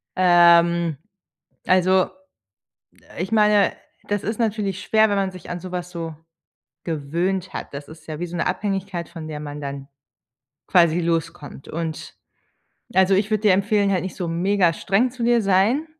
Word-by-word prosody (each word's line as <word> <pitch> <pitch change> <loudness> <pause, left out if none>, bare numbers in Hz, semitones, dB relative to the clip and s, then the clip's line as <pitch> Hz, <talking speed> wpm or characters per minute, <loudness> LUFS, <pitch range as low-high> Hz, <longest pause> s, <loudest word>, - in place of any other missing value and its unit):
Ähm, 170 -2 +4 0.7
also, 185 0 +4
äh, - - -6 1.1
ich 190 +4 -5
meine, 210 -2 +4 0.4
das 205 -1 -1
ist 220 +1 -3
natürlich 210 -4 -1
schwer, 220 0 +3
wenn 205 - 0
man 195 -1 0
sich 185 -3 -12
an 175 0 -4
so 185 +1 -9
was 180 -1 -4
so 165 -2 -6 0.7
gewöhnt 170 +4 -2
hat. - - -7
Das 140 0 -7
ist 160 +1 -14
ja 155 0 -6
wie 175 - -2
so 175 0 -7
'ne 170 - -1
Abhängigkeit, 195 -4 -2
von 165 -2 -9
der 150 -1 -6
man 145 0 -7
dann 140 -1 -6 0.8
quasi 170 -2 +4
loskommt 165 -4 -3
und 160 -1 -5 0.8
also, 190 +1 +4
ich 200 +2 +1
würde 215 -1 0
dir 210 -3 +5
empfehlen, 200 +1 +1
halt 190 -2 +1
nicht 185 - -6
so 175 -3 -3
megastreng 190 +5 +1
zu 245 0 -8
dir 240 0 +4
sein 200 +10 +2
185 Hz, 165 wpm, -22 LUFS, 165-200 Hz, 1.1 s, dir